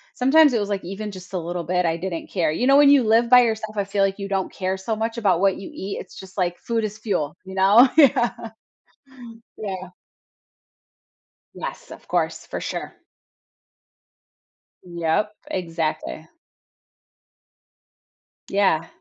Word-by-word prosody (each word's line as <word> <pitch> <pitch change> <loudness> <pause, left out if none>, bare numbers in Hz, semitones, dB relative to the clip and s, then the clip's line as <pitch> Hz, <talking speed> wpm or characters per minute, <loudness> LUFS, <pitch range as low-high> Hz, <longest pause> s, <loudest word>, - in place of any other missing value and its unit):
Sometimes 290 +3 +5
it 230 - +2
was, 205 0 -3
like, 200 -1 -2
even 205 +3 -5
just 185 -1 -12
a 185 - -1
little 175 0 -4
bit, 180 +1 0
I 165 0 +1
didn't 170 -1 -5
care. 165 -5 +1
You 240 +11 -1
know, 275 +1 +6
when 290 -1 +7
you 280 -3 +6
live 230 +2 +3
by 250 0 +8
yourself, 220 -2 -2
I 200 - +1
feel 195 0 0
like 195 +1 0
you 200 -1 -5
don't 195 -1 -2
care 185 0 -2
so 215 +4 -3
much 225 +2 -3
about 190 -5 +2
what 195 -1 +2
you 195 - -8
eat, 195 +1 -6
it's - - -14
just 190 0 -13
like 175 -1 0
food 230 -1 -2
is 210 0 -6
fuel, 195 -9 -2
you 190 - -9
know? 205 +7 +6
Yeah. 265 -5 +5 1.3
Yeah. 190 -3 -5 1.7
Yes, - - -7
of - - -12
course, - - -1
for - - -5
sure. - - -5 1.9
Yep, 170 +4 -1 0.2
exactly. 165 - -3 2.2
Yeah. 190 -5 +2
195 Hz, 155 wpm, -22 LUFS, 180-225 Hz, 2.2 s, by